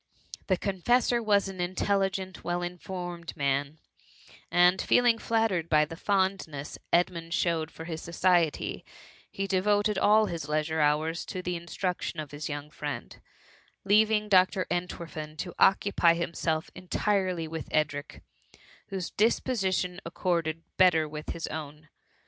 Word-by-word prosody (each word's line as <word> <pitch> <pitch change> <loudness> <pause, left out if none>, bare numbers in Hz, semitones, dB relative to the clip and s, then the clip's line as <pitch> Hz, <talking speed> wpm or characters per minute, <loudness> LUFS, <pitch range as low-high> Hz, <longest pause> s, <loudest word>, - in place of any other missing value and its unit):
The 185 - +2
confessor 235 +6 +1
was 205 -3 +3
an 190 -2 -5
intelligent, 190 +1 -1
well 175 0 -1
in 175 0 -5
formed 175 -2 -6
man, 140 +2 0 0.7
and 180 +1 +4
feeling 240 -2 +4
fiattared 220 -8 0
by 150 -1 +4
the 165 +2 -8
fond 190 +1 0
ness 145 -1 -7
Edmund 170 -1 +1
showed 165 -3 0
for 160 - -10
his 160 -2 -5
society, 170 -2 +1 0.5
he 195 - -3
de 190 -1 +1
voted 205 0 +2
all 215 +2 +5
his 165 -6 -5
leisure 155 +1 0
hours 155 +3 +1
to 185 - -5
the 180 0 -2
instruction 170 0 -3
of 150 -2 -6
his 145 +1 -5
young 145 0 -5
friend, 150 -1 -6 0.6
leaving 210 +1 +4
Dr. 185 -1 +4
Entwerfen 165 -3 -4
to 175 +2 -5
occupy 190 -3 +4
himself 165 -1 -2
entirely 185 -2 -1
with 160 0 -6
Edric, 150 -1 -2 0.6
whose 190 -3 -4
dii^ 225 +3 +2
position 190 -6 -1
accorded 165 -1 -1
better 170 -4 +5
with 150 0 -7
his 165 - -3
own. 150 0 -7
175 Hz, 140 wpm, -28 LUFS, 160-195 Hz, 0.7 s, all